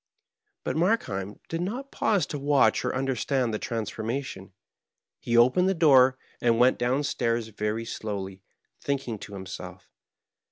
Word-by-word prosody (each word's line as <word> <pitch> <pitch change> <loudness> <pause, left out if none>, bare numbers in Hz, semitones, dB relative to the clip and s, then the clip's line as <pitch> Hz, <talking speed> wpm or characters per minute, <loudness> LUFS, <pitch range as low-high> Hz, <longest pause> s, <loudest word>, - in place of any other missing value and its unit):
But - - -2
Markheim 110 - 0
did 165 +1 -3
not 245 +10 -4
pause 205 -4 +1
to 145 - -5
watch 140 -6 +3
or - - -1
understand 130 -2 0
the 105 - -1
transformation. 115 -1 -4 0.7
He 120 0 0
opened 130 +11 +5
the 190 - +1
door 135 -5 +6 0.2
and 115 -1 +3
went 125 +2 +4
down 125 +4 +1
stairs 115 -5 -1
very 105 +2 -3
slowly, 95 -4 -5 0.4
thinking 135 -6 -3
to 100 - -9
him 95 -1 -7
self. 95 - -9
120 Hz, 145 wpm, -27 LUFS, 110-140 Hz, 0.7 s, door